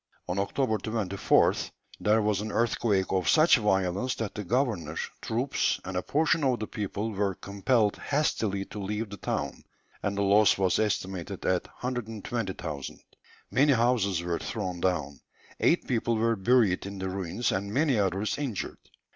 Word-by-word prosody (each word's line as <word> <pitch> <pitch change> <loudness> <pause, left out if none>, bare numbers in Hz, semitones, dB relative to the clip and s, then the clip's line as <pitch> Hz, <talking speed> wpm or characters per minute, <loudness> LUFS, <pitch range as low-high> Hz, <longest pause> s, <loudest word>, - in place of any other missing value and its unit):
On 90 +2 -1
October 110 +2 0
24th 105 -4 +1 0.3
there 105 +1 +3
was 105 -2 +1
an 105 0 -4
earthquake 105 -4 +1
of 95 -1 +1
such 155 -1 +6
violence 95 +3 +1
that 110 -3 -4
the 105 - -5
governor, 100 - 0 0.3
troops, 120 +5 0
and 95 0 -5
a 90 - +1
portion 155 - +1
of 130 -3 +2
the 110 - -2
people 105 +1 -3
were 100 -2 -1
compelled 105 +2 +1
hastily 110 -9 0
to 105 - -8
leave 105 +2 -3
the 100 - -6
town, - - -3 0.4
and 100 0 -2
the 100 - +1
loss 100 +1 +5
was 95 -1 +2
estimated 95 -3 -2
at 90 -1 +1 0.2
120,000_l_. 110 - -4 0.5
Many 140 +7 +4
houses 115 -7 +2
were 85 -1 -1
thrown 90 -1 -4
down, 75 -7 -1 0.4
eight - - +2
people 115 -1 +1
were 115 +1 +2
buried 100 -2 +3
in 100 0 -7
the 95 0 -3
ruins, 95 +4 -2
and 100 +2 -2
many 135 -1 +2
others 100 +6 0
injured. 130 -9 -4
105 Hz, 155 wpm, -28 LUFS, 95-115 Hz, 0.5 s, such